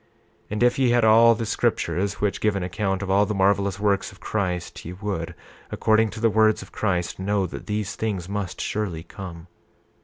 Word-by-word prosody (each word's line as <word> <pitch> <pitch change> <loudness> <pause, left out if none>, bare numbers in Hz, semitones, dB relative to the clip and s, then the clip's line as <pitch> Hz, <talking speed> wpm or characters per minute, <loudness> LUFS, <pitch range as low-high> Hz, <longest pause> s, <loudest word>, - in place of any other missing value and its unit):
28:33 - - -37 0.4
And 105 +3 -1
if 125 +2 +3
ye 130 -2 +4
had 120 -1 +3
all 115 +1 +7
the 115 +1 -3
scriptures 95 -1 0
which 105 -1 -1
give 105 -2 +2
an 95 - -2
account 95 +1 -2
of 95 - -2
all 100 +1 +4
the 105 - -2
marvelous 100 0 +2
works 100 -2 +1
of - - -17
Christ, 90 -5 -3
ye 85 - -7
would, 95 -4 -4 0.3
according 110 0 +2
to 110 - -8
the 115 0 +3
words 110 -1 +3
of 95 - -16
Christ, 90 -5 -1
know 100 0 0
that 90 - -8
these 105 -1 -2
things 100 -6 -3
must 100 -2 -4
surely 95 -7 -3
come. 85 -2 -9
100 Hz, 205 wpm, -24 LUFS, 95-110 Hz, 0.4 s, all